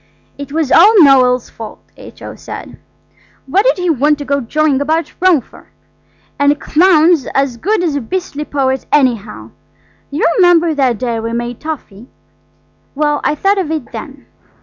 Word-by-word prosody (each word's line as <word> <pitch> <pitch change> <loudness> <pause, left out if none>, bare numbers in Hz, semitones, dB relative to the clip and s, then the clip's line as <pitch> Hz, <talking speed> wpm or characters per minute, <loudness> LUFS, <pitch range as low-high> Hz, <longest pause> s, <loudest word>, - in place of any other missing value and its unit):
"It 285 -1 -9
was 310 -2 -1
all 415 +6 +6
Noël's 255 -4 +4
fault," 225 -1 -9 0.2
H.O. - - -11
said; - - -10 0.7
"what 375 +10 +1
did - - +2
he 360 -2 0
want 295 +1 +1
to 285 - -7
go 280 +1 -1
jawing 285 +3 0
about 320 +3 -1
Rome 360 -6 +3
for?–and 285 +4 -6
a - - 0
clown's 325 -2 +3
as 270 -3 0
good 395 - -1
as 320 -5 -1
a 285 - -2
beastly 300 +2 -4
poet, 265 -2 -2
anyhow! 210 - 0 0.6
You 290 - -1
remember 345 -3 +4
that 260 -5 0
day 235 0 -3
we 230 +1 -4
made 240 0 -4
toffee? 255 -8 -8 0.9
Well, 295 0 0
I 300 - 0
thought 390 +6 +1
of 355 -5 -3
it 315 -5 -4
then." - - -9
290 Hz, 160 wpm, -14 LUFS, 255-325 Hz, 0.9 s, all